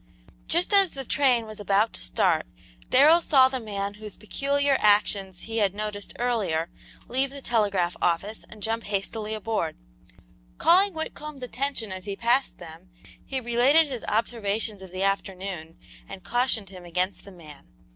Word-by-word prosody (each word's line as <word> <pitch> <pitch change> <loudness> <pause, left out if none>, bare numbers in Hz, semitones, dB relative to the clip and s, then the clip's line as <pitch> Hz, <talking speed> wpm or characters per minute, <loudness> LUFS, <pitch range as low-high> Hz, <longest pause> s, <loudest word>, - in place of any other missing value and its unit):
Just 350 +5 +1
as 395 -2 +7
the 270 -3 -7
train 250 -3 +2
was 215 -1 -8
about 205 +2 +2
to - - -9
start - - +1 0.4
Darrell 305 +6 +6
saw 265 -5 +5
the 260 -1 -3
man 200 -3 -4
whose 210 -1 -10
peculiar 280 +5 0
actions 200 -3 +2
he 225 0 -3
had 200 -2 +1
noticed 210 -1 -5
earlier, 200 -10 -1 0.4
leave 265 +3 0
the 280 +1 -8
telegraph 200 -8 +1
office 195 +6 0
and 215 -2 -12
jump 225 0 -2
hastily 210 +2 -3
aboard. 215 -6 -2 0.8
Calling 380 +3 +4
Whitcomb's 305 -3 -6
attention 250 -4 -3
as 185 +1 -6
he 200 -1 -4
passed 240 +5 +1
them, 170 +2 -12 0.3
he 270 - -3
related 255 +6 +3
his 250 -4 -5
observations 215 -2 -1
of 190 -2 -11
the 185 +1 -2
afternoon 190 -4 -3 0.3
and 185 - -9
cautioned 240 -3 0
him 185 -2 -11
against 180 +3 -2
the 200 - -12
man. 155 - -14
215 Hz, 155 wpm, -26 LUFS, 195-260 Hz, 0.8 s, as